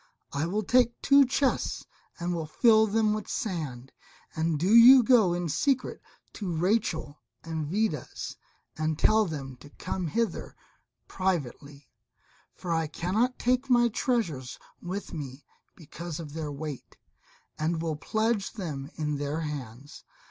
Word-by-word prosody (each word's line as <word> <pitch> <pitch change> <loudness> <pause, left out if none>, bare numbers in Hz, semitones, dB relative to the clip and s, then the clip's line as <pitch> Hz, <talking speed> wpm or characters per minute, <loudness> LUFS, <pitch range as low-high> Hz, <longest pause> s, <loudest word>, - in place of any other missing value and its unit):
I 145 +3 -1
will 210 +5 -1
take 240 +3 +3
two 280 -1 +6
chests 265 +1 0 0.3
and 170 -3 -3
fill 220 +4 +5
them 215 0 +2
with 215 -1 -4
sand, 145 - -4 0.4
and 160 0 0
do 180 +8 +1
you 245 +2 +9
go 220 -8 +4
in 175 -1 -2
secret 260 - 0 0.3
to 195 -4 -4
Rachel 165 -4 -1 0.2
and 160 -2 -4
Vidas, 190 - -2 0.4
and 155 0 -1
tell 215 +4 +4
them 135 -6 -6
to 145 +3 -14
come 180 +4 -4
hither 225 +3 -2 0.5
privately; 145 -6 -3 0.7
for 175 -2 -3
I 165 -1 0
cannot 205 +11 -1
take 255 +2 0
my 240 -1 +5
treasures 190 - -2 0.2
with 185 +3 -5
me 140 -3 -7 0.3
because 170 0 -8
of 150 -3 -8
their 155 -2 -4
weight, 145 -1 -7 0.6
and 160 +2 0
will 160 -1 -2
pledge 220 +5 -1
them 150 - -5
in 150 -2 -2
their 145 +3 -2
hands. 140 -3 -7
170 Hz, 135 wpm, -28 LUFS, 150-220 Hz, 0.7 s, you